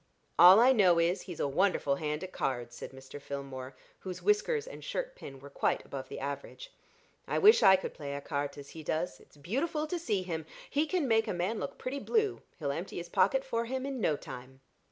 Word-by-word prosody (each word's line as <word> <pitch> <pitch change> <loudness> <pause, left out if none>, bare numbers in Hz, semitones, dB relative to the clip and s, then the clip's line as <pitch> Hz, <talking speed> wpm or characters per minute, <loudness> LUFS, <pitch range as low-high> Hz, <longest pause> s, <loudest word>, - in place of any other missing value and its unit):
"All 180 +4 +10
I 250 +3 +7
know 190 -8 +5
is, 170 +3 +2
he's 175 -4 -8
a - - +1
wonderful 145 -2 +1
hand 150 +1 -3
at 185 - -7
cards," 120 -2 -2
said - - -7
Mr. 135 +2 -11
Filmore, 135 -2 -6 0.3
whose 185 -2 -7
whiskers 420 +2 +2
and - - -10
shirt - - -4
pin 135 - -10
were 140 +1 -12
quite - - 0
above 135 -1 -7
the - - -6
average. 140 - -6 0.5
"I - - 0
wish 430 +3 +7
I 190 - +8
could 190 - -4
play 140 -2 -5
écarté 145 0 -3
as 140 -1 -10
he 160 - -9
does; 160 +3 -2
it's - - -21
beautiful 280 - -1
to 345 +3 -3
see 210 - -1
him; 160 -3 -4 0.2
he 300 +2 0
can 345 -4 0
make 225 -1 +3
a - - -1
man 185 +6 -1
look - - -5
pretty 270 +2 -4
blue; 430 +3 0 0.2
he'll 140 -3 -2
empty 170 +7 -5
his 175 0 -6
pocket 270 +8 +2
for 230 -3 -1
him 260 +2 -3
in 270 -3 -4
no 155 - +2
time." 130 -1 -10
180 Hz, 215 wpm, -31 LUFS, -, 0.5 s, All